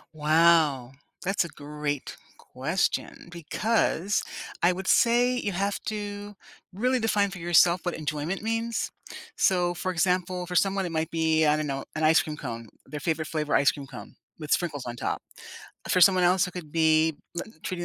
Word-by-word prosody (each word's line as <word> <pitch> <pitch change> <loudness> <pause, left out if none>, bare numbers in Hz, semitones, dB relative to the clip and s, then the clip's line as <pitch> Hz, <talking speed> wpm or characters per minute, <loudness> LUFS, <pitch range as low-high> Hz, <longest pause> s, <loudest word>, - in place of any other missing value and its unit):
Wow! 155 -4 +3 0.3
That's 195 -1 +1
a - - -6
great 145 -2 -5 0.2
question - - -3
because 195 +2 0 0.4
I 175 - +5
would 185 +1 -5
say 245 +4 +4
you 205 - -2
have 200 +2 -1
to 205 -1 -5 0.4
really 250 +7 0
define 205 -3 +1
for 195 - -8
yourself 175 +1 +4
what 175 - -2
enjoyment 155 +5 -3
means. 225 +1 -2 0.5
So, 175 -2 +2
for 185 +2 -3
example, 180 +1 0
for 180 - -7
someone, 195 +1 +2
it 175 - -4
might 160 0 -1
be, 160 -1 +2
I 150 - +4
don't 155 - -2
know, 135 -1 -3
an 155 - -2
ice 160 +1 +5
cream 150 -1 -6
cone- 115 -5 -6 0.2
their 150 - -7
favorite 155 +1 -2
flavor 155 -2 -1
ice 140 - +5
cream 140 -2 -9
cone- 120 -6 -11 0.3
with 150 -2 -7
sprinkles 150 -7 0
on 120 0 -6
top. - - -2 0.7
For 180 - +2
someone 185 0 +6
else, 180 +1 +3
it - - -10
could 165 -5 -8
be 160 -1 +3 0.2
li 220 +6 -5
treating 175 -1 -4
170 Hz, 175 wpm, -26 LUFS, 155-195 Hz, 0.7 s, someone